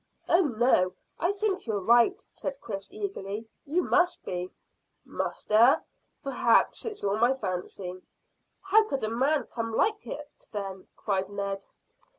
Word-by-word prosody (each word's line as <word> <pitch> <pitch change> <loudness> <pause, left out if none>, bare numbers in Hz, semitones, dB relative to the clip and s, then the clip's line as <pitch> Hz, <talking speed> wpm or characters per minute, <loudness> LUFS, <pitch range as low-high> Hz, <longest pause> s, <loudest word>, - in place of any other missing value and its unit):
"Oh 340 - +5
no: 240 - +3 0.3
I 345 - +2
think 400 - -1
you're 215 -3 0
right," 240 - +4
said 280 -1 -5
Chris 200 -3 -6
eagerly. 230 - -5 0.2
"You 330 +5 +1
must 360 -1 +2
be." 180 0 -3 0.6
"Must, - - -4
eh? 230 +5 +7 0.5
P'raps 245 -4 +2
it's 430 -2 -5
all 200 +1 +1
my 240 +3 +5
fancy." 185 -4 -5 0.6
"How 405 +3 +5
could 275 -3 -2
a 215 - +1
man 270 +5 +2
come 230 -1 -4
like 430 - +2
that, 295 0 -8
then?" 195 -3 -5
cried 195 -2 -1
Ned. 200 -1 -4
235 Hz, 145 wpm, -28 LUFS, -, 0.6 s, eh